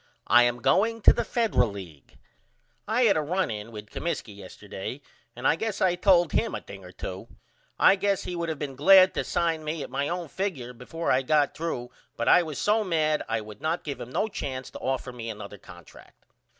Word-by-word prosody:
I 120 0 +6
am 120 0 -1
going 225 +6 +2
to - - +8
the 235 - -1
Federal 220 - +1
League. 90 -9 -11 0.7
I 225 +4 +2
had 215 -4 +5
a 155 - +2
run 180 +1 -1
in 105 +1 -6
with 105 -1 -10
Comiskey 145 -11 -4
yesterday 100 +5 -8 0.4
and 125 +2 -1
I - - +4
guess 220 +2 -3
I 185 -2 +3
told 175 -2 +4
him 230 - 0
a - - -5
thing - - -11
or - - -11
2. - - -7 0.5
I 195 - +6
guess 200 0 0
he 180 - -5
would 170 -1 -3
of 160 - -3
been 140 -2 -5
glad 185 +6 +7
to - - -1
sign 165 -2 -1
me 155 -1 -3
at - - -9
my 140 +1 -1
own 175 -1 -3
figure 145 -9 -4
before 145 +8 -3
I 130 - +3
got 145 +2 +2
threw 125 -7 -4 0.3
but 115 - -2
I 180 - +7
was 155 -4 -5
so 215 +1 +2
mad 155 -5 +1
I 115 0 0
would 105 +1 -11
not 160 +3 -1
give 140 -4 -5
him 120 - -7
no 210 - 0
chance 130 -10 -5
to - - -9
offer 130 -1 -2
me 115 -2 -6
another 105 -2 -8
contract. 85 -3 -16
150 Hz, 215 wpm, -26 LUFS, 120-180 Hz, 0.7 s, to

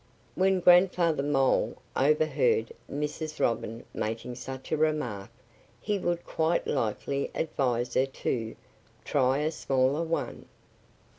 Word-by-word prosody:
When 190 0 +2
Grandfather 175 -3 +5
Mole 135 -2 +1 0.2
overheard 155 - +2 0.2
Mrs. 150 +2 -4
Robin 115 0 -1
making 115 +3 -3
such 130 +2 -8
a - - +3
remark 150 -11 -1 0.5
he 205 -1 -1
would 175 -1 -2
quite 165 +2 0
likely 140 +2 -1
advise 125 -6 -1
her 130 - +3
to 115 -4 -3 0.5
"try 130 -1 +2
a 150 +2 0
smaller 135 0 +1
one." 165 0 -3
145 Hz, 115 wpm, -28 LUFS, 130-165 Hz, 0.5 s, Grandfather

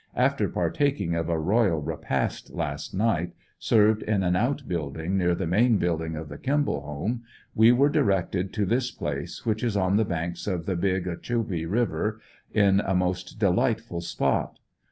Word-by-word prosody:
After - - +2
partak 145 -1 0
ing 85 -3 -1
of 85 0 -1
a 85 - +1
royal 95 +1 +2
repast 75 - -2
last - - -3
night, 90 -5 0 0.3
served 110 0 +3
in 105 -3 0
an 90 0 +2
out 130 +7 0
building 80 +1 -3
near 90 -2 +2
the 95 - -2
main 110 +7 +3
building 80 -3 -1
of 80 0 -6
the 75 0 -9
Kimball 145 - 0
home, 75 +12 -3 0.3
we 110 +2 +6
were 130 +4 +4
directed 100 - +1
to 105 - 0
this 120 +5 +1
place - - -5
which 110 +1 0
is 115 -4 0
on 95 +1 +2
the 110 - +3
banks 85 0 -4
of 90 -4 -2
the 95 - -1
Big 95 +1 0
Ogechee 90 -2 -2
river, 110 0 0 0.3
in 100 -2 +4
a 95 -2 0
most 90 +1 -1
delightful 105 -1 +1
spot. 70 -5 -1
95 Hz, 175 wpm, -26 LUFS, 85-110 Hz, 0.3 s, we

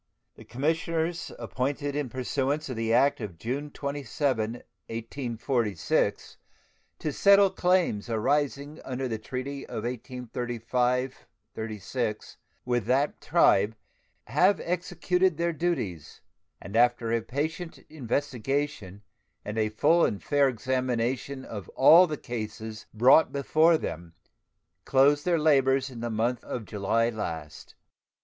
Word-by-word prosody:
The - - -15
commissioners 165 +4 -1
appointed 135 +6 -3
in 145 -3 -2
pursuance 135 +4 -2
of 130 - -4
the 115 0 -1
act 140 +3 +3
of 100 -6 -6
June 135 - -3
27, 140 -5 -2
1846, 115 - -2 0.6
to 150 - -3
settle 200 +2 +5
claims 175 - +1
arising 145 +6 -1
under 130 0 -3
the 110 -3 -3
treaty 130 +4 -5
of 110 - -5
1835 125 +1 -2 0.3
36 110 +1 -4 0.3
with 120 -4 0
that 135 +5 +1
tribe 105 +3 +3 0.5
have 180 - +3
executed 180 0 0
their 170 0 0
duties, 130 - -3 0.4
and 100 - -9
after 120 -1 +3
a 115 0 +1
patient 160 +8 -4
investigation 135 -6 -3 0.4
and 105 +2 -3
a 110 -1 +1
full 155 +10 +3
and 100 - 0
fair 145 -2 +3
examination 130 +2 -2
of 105 -4 -7
all 170 +7 +8
the 155 -2 -4
cases 110 -2 -6
brought 125 +8 +5
before 155 +4 +3
them 85 - -6 0.7
closed 145 +5 +3
their 175 -2 +3
labors 135 -3 +3
in 120 - -9
the 120 +1 -3
month 115 +2 -1
of 115 -4 -5
July 105 +4 0
last. 80 -9 -6
130 Hz, 120 wpm, -27 LUFS, 115-145 Hz, 0.7 s, all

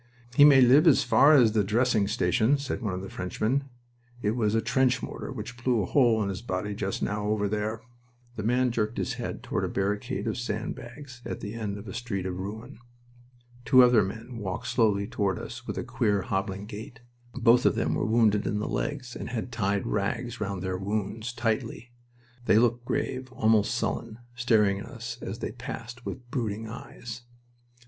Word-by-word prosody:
"He 145 - +8
may 140 -3 +8
live 135 +7 +6
as 150 - +6
far 145 +3 +6
as 120 -6 +6
the 105 -1 +2
dressing 110 0 +2
station," 120 +4 +2
said 140 -2 -4
one 105 -5 -2
of 95 - -5
the - - -6
Frenchmen. 110 +9 -1 0.6
"It 105 - +2
was 110 -2 +1
a - - +4
trench 130 +2 +2
mortar - - -6
which 125 -1 -8
blew 120 -5 +2
a - - -2
hole 115 -4 +3
in 100 - -2
his 95 0 -4
body 105 -2 -3
just 100 -1 -3
now, 105 0 -1
over 105 -1 +1
there." 105 +2 -2 0.5
The 110 - -4
man 125 +3 +2
jerked 110 -1 -1
his - - -1
head - - -5
toward - - -2
a - - 0
barricade 105 +6 -2
of - - -2
sand 110 -2 -3
bags 130 +1 -11
at - - -5
the 105 0 -6
end 105 -3 -4
of 100 +2 -10
a 95 - -6
street 110 -6 -3
of 90 -1 -3
ruin. 110 +7 -7 0.8
Two 125 +2 +7
other 120 -3 +6
men 110 +5 -5
walked 95 -3 -4
slowly 105 -4 +2
toward 100 -5 -1
us - - -8
with - - -4
a - - -2
queer, 100 -2 0
hobbling 95 0 -2
gait. 110 +2 -9 0.3
Both 125 -1 +5
of - - +2
them - - 0
were - - 0
wounded 110 -2 +3
in 105 - 0
the 105 - -2
legs, 125 -4 -3
and - - -6
had 120 0 -4
tied 100 -4 0
rags 120 +4 -2
round 100 -3 -3
their 95 -1 -2
wounds 105 +4 -3
tightly. 120 0 -2 0.5
They - - +5
looked 120 +1 +2
grave, 130 +1 -2
almost 110 0 +3
sullen, 115 -2 -2 0.2
staring 110 -5 +2
at - - -8
us 115 -2 -7
as 100 +4 -5
they - - -4
passed, 120 +1 -8
with 120 -1 -7
brooding 110 -3 -2
eyes. 120 -1 -8
110 Hz, 195 wpm, -27 LUFS, 105-125 Hz, 0.8 s, He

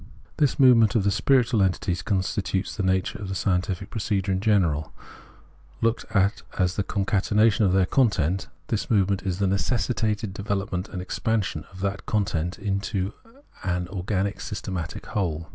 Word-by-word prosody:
This 145 -1 +2
movement 120 -4 +6
of 110 - +3
the 100 - +2
spiritual 125 -1 +3
entities 90 -2 0
constitutes 95 0 -1
the - - -2
nature 95 0 0
of 95 -2 -4
scientific 95 0 -1
procedure 100 -3 -1
in 95 - +1
general. 90 -8 +1 0.9
Looked 115 0 0
Preface 100 -1 +2
33 - - -21
at - - -10
as 90 0 0
the 100 - 0
concatenation 105 +2 +2
of 95 - +2
their 95 -1 +4
content, 95 - +1 0.2
this 110 - -1
movement 100 -3 +2
is 95 -2 -2
the 100 - +1
necessitated 105 +1 0
development 100 -1 -3
and 90 -3 -5
expansion 110 +1 -1
of 95 0 -11
that 100 0 -3
content 90 -5 -1
into 100 -1 -2 0.5
an 90 -1 -1
organic 100 +1 -2
systematic 95 -5 -5
whole. 85 -5 -2
100 Hz, 155 wpm, -25 LUFS, 95-105 Hz, 0.9 s, movement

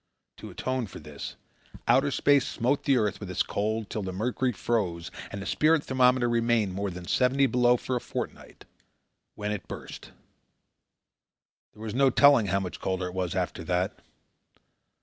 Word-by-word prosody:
To - - -9
atone 130 -3 -2
for - - -10
this, 75 -2 -8 0.5
outer 135 +4 +4
space 140 -1 +3
smote 140 +5 0
the 135 -2 +4
earth 105 -3 0
with 100 - -7
its 90 - +1
cold 110 +1 -2
till 110 - -2
the 95 -1 -4
mercury 125 +6 -1
froze 95 -7 -2 0.2
and 100 - -6
the 100 - -6
spirit 155 +6 +3
thermometer 125 -1 +3
remained 115 -4 +1
more 100 +1 -2
than 90 -1 -8
seventy 130 +8 +3
below 125 -1 +3
for 130 - -3
a 120 - -1
fortnight, - - -7 0.7
when 105 0 -3
it 105 -3 -5
burst. - - -9 1.6
There 110 - -12
was 110 -2 -4
no 135 +2 +4
telling 135 -4 +5
how 100 +2 +1
much 90 - -6
colder 95 -1 -2
it - - -10
was 90 -1 -2
after 90 -2 -2
that. 90 +2 -1
110 Hz, 170 wpm, -27 LUFS, 95-130 Hz, 1.6 s, telling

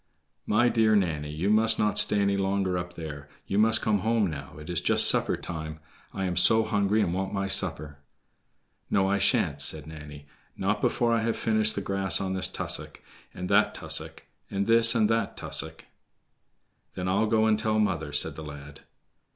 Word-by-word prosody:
"My 115 +4 +2
dear 110 -2 +2
Nanny, 80 -7 -1
you 80 +7 -2
must 110 +1 +3
not 105 0 +1
stay 105 - +2
any 100 0 +1
longer 95 -1 -1
up 90 0 -5
there; 75 -3 -8 0.2
you 100 - -1
must 110 +1 +3
come 105 -2 +1
home 110 +2 0
now, 70 -1 -9
it 75 0 -11
is 90 -2 -2
just - - +4
supper - - +3
time. 80 -2 -7 0.3
I 95 - -5
am 90 -1 -3
so 110 +4 +5
hungry 100 0 0
and 85 -3 -2
want 95 +2 -3
my 100 0 -2
supper." 85 -7 -1 0.9
"No, 95 -1 +1
I 100 +1 0
sha'n't," 70 -6 +1
said 75 0 0
Nanny, 75 -2 -11 0.3
"not 105 +2 -1
before 120 -1 0
I 115 - +1
have 115 0 -2
finished 110 -1 0
the 100 - -3
grass 95 0 0
on 95 -1 -3
this 95 - 0
tussock, - - -1 0.3
and 90 - -7
that 100 +2 +2
tussock—and 100 0 -2
this 115 +2 +5
and 110 -2 +3
that 115 0 -2
tussock." 80 0 -5 1.1
"Then 90 - -4
I'll 100 +4 +1
go 110 0 +2
and 110 -1 +2
tell 110 -1 -1
mother," 85 -8 -1
said 75 - -1
the 80 - -8
lad. 70 -1 -11
95 Hz, 185 wpm, -26 LUFS, 80-110 Hz, 1.1 s, so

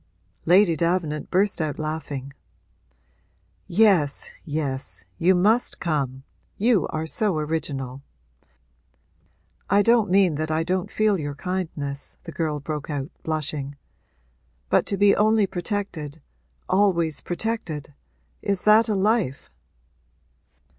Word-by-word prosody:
Lady 180 0 +5
Davenant 170 -2 -1
burst 190 -1 +1
out 150 -3 -2
laughing. 150 -3 -4 1.3
'Yes, 175 -7 +3
yes, 145 - -4
you 185 +2 +4
must 215 +7 +2
come; 135 -6 -2 0.3
you 215 -5 +3
are 155 +1 -3
so 200 +1 0
original!' 145 -4 -3 1.7
'I 200 +1 +4
don't 230 -2 +4
mean 185 -4 +4
that 155 - -2
I 160 +1 +1
don't 180 +1 -1
feel 215 -3 +2
your 145 -2 -4
kindness,' 155 -5 -4
the 165 - -8
girl 155 -1 -2
broke 150 +1 -5
out, 140 -2 -3
blushing. 150 -3 -3 1.0
'But - - +3
to 200 - -1
be 200 +1 +5
only 215 0 +4
protected 175 -6 -4 0.5
always 180 -6 +2
protected: 175 -7 -3 0.5
is 200 -3 0
that 220 +2 +5
a 210 - +1
life?' 195 - 0
165 Hz, 115 wpm, -24 LUFS, 150-200 Hz, 1.7 s, Lady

